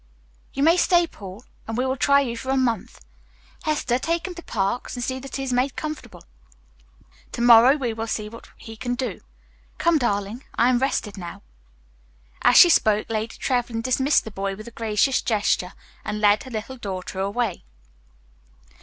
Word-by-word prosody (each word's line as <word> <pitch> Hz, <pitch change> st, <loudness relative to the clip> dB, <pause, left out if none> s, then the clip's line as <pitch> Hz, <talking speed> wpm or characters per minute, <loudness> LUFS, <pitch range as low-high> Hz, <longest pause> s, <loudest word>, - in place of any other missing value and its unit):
"You 275 Hz, -, -1 dB
may 330 Hz, +3 st, +5 dB
stay, 350 Hz, -1 st, +4 dB
Paul, 200 Hz, -, -11 dB, 0.2 s
and 225 Hz, 0 st, -4 dB
we 255 Hz, -, +1 dB
will 260 Hz, 0 st, 0 dB
try 280 Hz, +1 st, +4 dB
you 240 Hz, -4 st, -3 dB
for 260 Hz, +3 st, -7 dB
a 270 Hz, -, +2 dB
month. 245 Hz, -4 st, -1 dB, 0.6 s
Hester, 275 Hz, -5 st, 0 dB
take 335 Hz, +5 st, -1 dB
him 370 Hz, -, -6 dB
to 345 Hz, -, -9 dB
Parks 200 Hz, -, -2 dB
and 245 Hz, -, -4 dB
see 260 Hz, +1 st, -3 dB
that 270 Hz, 0 st, -8 dB
he 270 Hz, -, -3 dB
is 260 Hz, -2 st, -2 dB
made 255 Hz, +2 st, 0 dB
comfortable. 310 Hz, 0 st, -7 dB, 1.1 s
Tomorrow 240 Hz, +2 st, +6 dB
we 250 Hz, -6 st, -2 dB
will 225 Hz, 0 st, -4 dB
see 215 Hz, -1 st, -3 dB
what 230 Hz, +2 st, -12 dB
he 225 Hz, -1 st, -10 dB
can 245 Hz, +2 st, -3 dB
do. 245 Hz, -6 st, -4 dB, 0.6 s
Come, 335 Hz, -2 st, +3 dB
darling, 210 Hz, +1 st, -2 dB
I 240 Hz, -, +3 dB
am 250 Hz, -1 st, +3 dB
rested 240 Hz, -6 st, -1 dB
now." 175 Hz, -1 st, -8 dB, 1.0 s
As 245 Hz, -, +5 dB
she 355 Hz, -, +10 dB
spoke, 215 Hz, -10 st, +2 dB
Lady 220 Hz, 0 st, -3 dB
Trevlyn 240 Hz, -3 st, -1 dB
dismissed 265 Hz, +3 st, +2 dB
the 220 Hz, -, -8 dB
boy 195 Hz, 0 st, -3 dB
with 215 Hz, +3 st, -11 dB
a -, -, -9 dB
gracious 225 Hz, +3 st, +1 dB
gesture 205 Hz, -4 st, 0 dB, 0.3 s
and 210 Hz, -, -4 dB
led 210 Hz, +2 st, +3 dB
her -, -, -9 dB
little 235 Hz, +3 st, -6 dB
daughter 190 Hz, -4 st, -6 dB
away. 200 Hz, +1 st, -2 dB
240 Hz, 180 wpm, -23 LUFS, 215-265 Hz, 1.1 s, she